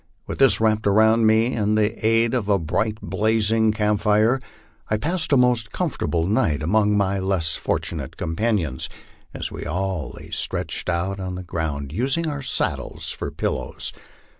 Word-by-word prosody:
With - - -6
this 130 -7 +6
wrapped 110 -1 +2
around 110 +2 +4
me 110 +3 +3
and 105 -1 +1
the 105 0 0
aid 115 +1 +3
of 115 -5 -1
a 100 - +4
bright 105 +6 -1
blazing 110 0 +2
camp 105 -1 +1
fire, 110 +5 +3 0.5
I 110 - +1
passed 160 +6 -1
a 140 - +5
most 120 -4 +2
comfortable 105 - -1
night 80 -6 +1
among 105 +4 +2
my 100 -1 +1
less 95 -4 0
fortunate - - -3
companions, 85 - -1 0.4
as - - -5
we - - -6
all 95 -1 -2
lay - - -11
stretched - - -2
out 95 +3 -1
on 95 -1 -4
the 90 - -6
ground, 75 -5 -3
using 135 - 0
our 145 -2 -3
saddles 130 - -2
for - - -4
pillows. - - -3
105 Hz, 165 wpm, -23 LUFS, 95-115 Hz, 0.5 s, this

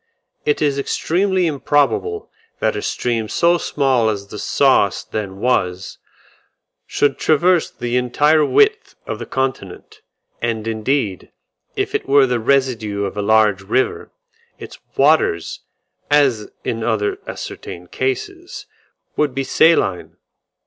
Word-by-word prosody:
It 150 +1 +1
is 140 -2 +1
extremely 185 +6 0
improbable 150 - 0 0.3
that - - 0
a - - -3
stream 115 -3 -2
so 170 0 +2
small 130 -8 +1
as 100 -2 -3
the 105 - -8
Sauce 130 -7 +2
then 100 -3 -5
was, 95 -6 -1 0.9
should 145 - 0
traverse 170 +2 +2
the 120 +1 -3
entire 150 +5 +3
width 430 - +2
of - - -5
the - - -7
continent; 130 -9 -4 0.4
and 115 -2 -2
indeed, 110 - -2 0.4
if - - -2
it - - -3
were 140 0 +6
the 125 -2 -1
residue 115 -5 0
of 100 - -5
a 105 - -2
large 105 -1 +3
river, 110 +7 -1 0.5
its - - -11 0.2
waters, 135 - +2 0.5
as 135 -7 +2
in 115 -1 -3
other 110 -3 -1
ascertained 85 0 -8
cases, 130 0 -4 0.5
would 145 -4 0
be 135 - -1
saline. 130 - +2
130 Hz, 125 wpm, -19 LUFS, 105-145 Hz, 0.9 s, were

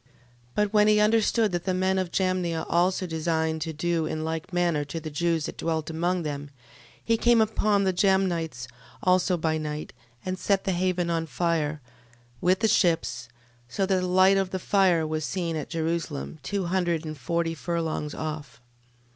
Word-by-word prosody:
12:8. - - -34 0.5
But 210 0 +1
when 210 0 +5
he 210 0 +5
understood 220 0 +3
that 175 0 -3
the 185 -1 0
men 190 +1 +1
of 185 -2 -2
Jamnia 180 -3 0
also 185 +2 +1
designed 160 -1 -1
to 160 - -2
do 165 +1 -1
in 155 0 -3
like 160 +1 -4
manner 175 -4 +1
to 145 +3 -5
the 155 -1 -7
Jews 165 0 0
that - - -7
dwelt 160 -1 -2
among 175 +2 0
them, 145 -2 -4
12:9. - - -14 0.5
He 230 0 +2
came 240 0 +4
upon 215 -2 +2
the 190 -1 +1
Jamnites 175 -8 +1 0.4
also 185 0 +3
by 160 -1 0
night, 150 0 -5 0.3
and 185 0 -3
set 195 -1 +1
the 195 - 0
haven 180 -1 0
on 165 -1 -1
fire, 155 0 -1 0.6
with 185 +2 +2
the 220 - +4
ships, 165 - +1 0.4
so 195 +10 0
that 190 -1 +1
the 180 - -1
light 185 +2 +5
of 195 -1 0
the 185 - -3
fire 185 -3 +2
was 155 0 -2
seen 170 0 -2
at 155 - -4
Jerusalem, 165 -2 -3
two 195 +7 -2
hundred 175 -2 0
and 155 0 -5
forty 165 +5 -1
furlongs 160 0 -3
off. 155 -5 -6
170 Hz, 185 wpm, -26 LUFS, 160-185 Hz, 0.6 s, when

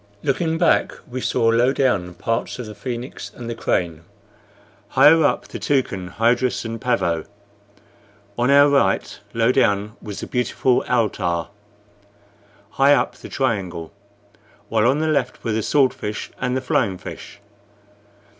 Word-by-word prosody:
Looking 160 +4 0
back, 170 0 +2
we 125 +1 -5
saw, 115 -2 +1
low 120 +3 +3
down, 100 -11 0
parts 115 +1 -2
of 125 - -6
the 105 - -8
Phoenix 120 +3 -6
and 120 - -8
the 115 - -3
Crane; 85 -7 -1 0.9
higher 160 +2 +6
up, 145 - 0
the - - -7
Toucan, 125 -10 -1
Hydrus, 120 +2 +1
and 115 0 -5
Pavo. 85 -10 0 1.1
On 120 +3 +1
our 140 +1 +7
right, 140 -1 +1 0.2
low 115 +1 +3
down, 105 -5 +1
was 105 -2 -7
the - - -4
beautiful 125 0 0
Altar; 90 -8 0 1.2
higher 140 +1 +5
up, - - -2
the - - -11
Triangle; 95 - -2 0.8
while 110 0 +2
on 135 +3 +3
the 160 - 0
left 140 -5 -1
were 115 - -1
the 110 +1 0
Sword 135 +3 +3
fish 105 0 -5
and 125 0 0
the - - -2
Flying 110 -6 0
fish. - - -10
120 Hz, 145 wpm, -21 LUFS, 105-130 Hz, 1.2 s, our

